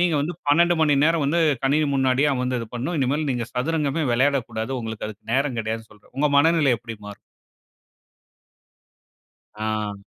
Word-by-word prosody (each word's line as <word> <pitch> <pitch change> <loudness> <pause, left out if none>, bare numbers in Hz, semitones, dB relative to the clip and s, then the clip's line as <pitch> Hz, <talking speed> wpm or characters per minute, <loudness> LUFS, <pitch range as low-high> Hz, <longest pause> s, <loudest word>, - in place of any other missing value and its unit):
நீங்க 175 -2 +2
வந்து 160 +4 -3
12 170 +4 +4
மணி 150 -2 +4
நேரம் 165 -1 +2
வந்து, 160 +5 +1 0.2
கணினி 150 +3 +2
முன்னாடியே 135 +2 +2
அமர்ந்து 125 -1 -1
இது 115 - -6
பண்ணணும். 135 +8 -3
இனிமேல் 145 +3 0
நீங்க 120 -3 -2
சதுரங்கமே 150 +3 -1
விளையாடக்கூடாது. 125 -3 0
உங்களுக்கு 110 -2 -5
அதுக்கு 110 +1 -10
நேரம் 135 -3 0
கிடையாதுன்னு 110 0 -5
சொல்றேன். 105 -1 -23
உங்க 150 +1 +3
மனநிலை 160 -2 +4
எப்பிடி 115 -1 -8
மாறும்? 100 - -9 2.4
ஆ. 105 -2 -3
135 Hz, 145 wpm, -23 LUFS, 115-150 Hz, 2.4 s, 12